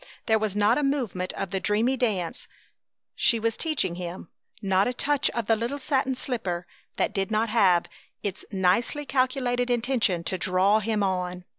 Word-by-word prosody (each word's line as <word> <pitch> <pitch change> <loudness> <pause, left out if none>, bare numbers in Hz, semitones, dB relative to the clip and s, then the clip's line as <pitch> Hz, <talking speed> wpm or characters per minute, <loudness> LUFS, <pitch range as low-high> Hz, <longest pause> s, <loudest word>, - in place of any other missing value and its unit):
There 220 -1 +3
was 210 -2 -2
not 210 +5 +3
a - - -1
movement 245 -10 -1
of 195 -2 -4
the 190 - -1
dreamy 215 +7 +1
dance 210 -9 -2 0.7
she 230 - +2
was 225 0 0
teaching 300 - 0
him, 175 0 -7 0.3
not 195 -1 +2
a 250 - -1
touch 290 +2 +2
of 235 -2 -3
the 225 - +3
little 235 +6 -3
satin 270 -1 0
slipper, 190 -10 -3 0.3
that - - 0
did 195 -1 -1
not 220 +1 +1
have 190 -6 +4 0.4
its 200 -2 -4
nicely 195 +10 +1
calculated 255 -2 0
intention 235 -7 +1
to 185 +2 -3
draw 185 +4 +3
him 215 -1 0
on. 180 -1 -2
215 Hz, 170 wpm, -26 LUFS, 185-245 Hz, 0.7 s, have